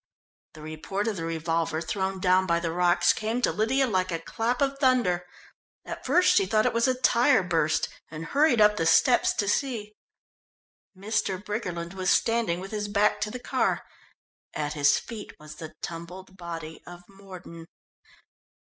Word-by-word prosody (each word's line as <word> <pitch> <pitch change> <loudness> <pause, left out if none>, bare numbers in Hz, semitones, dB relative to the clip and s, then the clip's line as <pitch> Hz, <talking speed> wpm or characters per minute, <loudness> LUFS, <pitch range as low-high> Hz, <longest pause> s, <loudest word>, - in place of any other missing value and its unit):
The 155 - -11
report 155 +7 -4
of 215 -3 -1
the 165 - -4
revolver 165 0 -1
thrown 190 +3 -3
down 185 0 +3
by 170 -1 +2
the 170 -1 -2
rocks 175 +1 +3
came 220 +3 -2
to - - +3
Lydia 255 +6 +1
like 185 -5 0
a 165 - -1
clap 225 +8 -2
of 275 0 0
thunder. 240 -10 +2 0.6
At - - -7
first 360 0 +4
she 195 - +3
thought 215 +2 +2
it - - +1
was 230 +1 +2
a 255 -1 0
tyre 245 -2 +4
burst 165 -3 +1 0.2
and 160 +1 -7
hurried 280 - +3
up 210 0 +5
the 165 - +1
steps 250 - +4
to 205 - -1
see. 215 -2 -1 1.0
Mr. 200 -1 -1
Briggerland 180 -4 -4
was 185 -1 -2
standing 225 -7 +2
with 190 +1 -8
his 210 -1 -3
back 205 +1 +1
to 210 - -1
the 250 - -6
car. 245 - -1 0.7
At 150 0 -2
his 145 -1 +3
feet 220 -3 -8
was 150 0 -11
the 155 -1 -9
tumbled 180 +3 -8
body 165 -3 -7
of 175 0 -11
Mordon. 185 -4 -12
190 Hz, 170 wpm, -26 LUFS, 170-220 Hz, 1.0 s, up